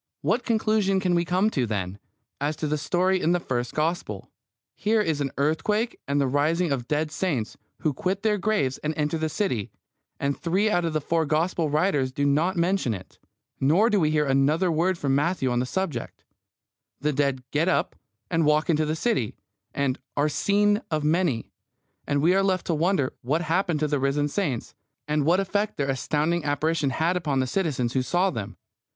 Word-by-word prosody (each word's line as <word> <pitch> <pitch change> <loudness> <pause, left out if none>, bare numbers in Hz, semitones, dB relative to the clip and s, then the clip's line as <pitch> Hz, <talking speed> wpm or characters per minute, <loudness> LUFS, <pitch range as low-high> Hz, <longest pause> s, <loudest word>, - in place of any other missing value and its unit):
What 245 - +1
conclusion 215 -4 +1
can 185 -2 +1
we 170 0 +2
come 185 +5 +2
to, 125 - 0
then, 100 -2 -3 0.4
as 145 +2 -1
to 155 - -4
the 150 0 -1
story 185 +4 +1
in 170 - +2
the 175 - +2
first 125 -6 -3
Gospel? 165 +3 -2 0.4
Here 220 +1 +1
is 160 -8 0
an 140 - 0
earthquake 210 - 0
and 140 +1 +1
the 140 - +2
rising 155 +5 +1
of 125 -3 -2
dead 150 +1 0
saints, 150 - -2 0.3
who 155 - +1
quit 190 +8 -2
their 210 -2 +2
graves 180 -11 0
and 155 +1 -3
enter 150 +1 0
the 160 0 -1
city, 145 - -1 0.5
and 140 0 0
three 190 +6 +1
out 175 -2 +1
of 165 - -1
the 155 - 0
four 165 +1 0
Gospel 160 +1 +1
writers 150 -4 +1
do 140 +2 -1
not 160 +7 +2
mention 170 - +1
it. 95 - -12 0.4
Neither 175 - +3
do 205 - +3
we 155 -3 +2
hear 150 -1 +2
another 145 +6 +2
word 170 +3 +1
from 140 -4 0
Matthew 145 -2 +1
on 120 - +1
the 125 - -1
subject. 190 +1 -4 0.8
The 150 +2 0
dead 140 -2 0
get 155 +4 +1
up 185 - +1 0.4
and 165 -1 +2
walk 150 +2 +3
into 155 -1 +1
the 155 - 0
city, 160 - 0 0.4
and 140 -2 -1 0.2
"are 145 +1 +3
seen 205 +6 +2
of 155 -2 -1
many," 155 -6 +1 0.6
and 145 0 +1
we 175 +3 +5
are 195 - +3
left 190 -2 0
to 170 - 0
wonder 160 -4 +1
what 155 +7 0
happened 175 -1 0
to 155 - +2
the 145 -1 0
risen 140 +2 +1
saints, 145 - -2 0.3
and 150 -1 0
what 175 +3 +4
effect 205 +2 -1
their 140 -1 0
astounding 155 +5 0
apparition 150 +1 0
had 160 +7 0
upon 150 -6 0
the 130 - +2
citizens 130 -6 -1
who 130 - +2
saw 175 +9 +1
them. 105 - -6
155 Hz, 195 wpm, -25 LUFS, 140-185 Hz, 0.8 s, we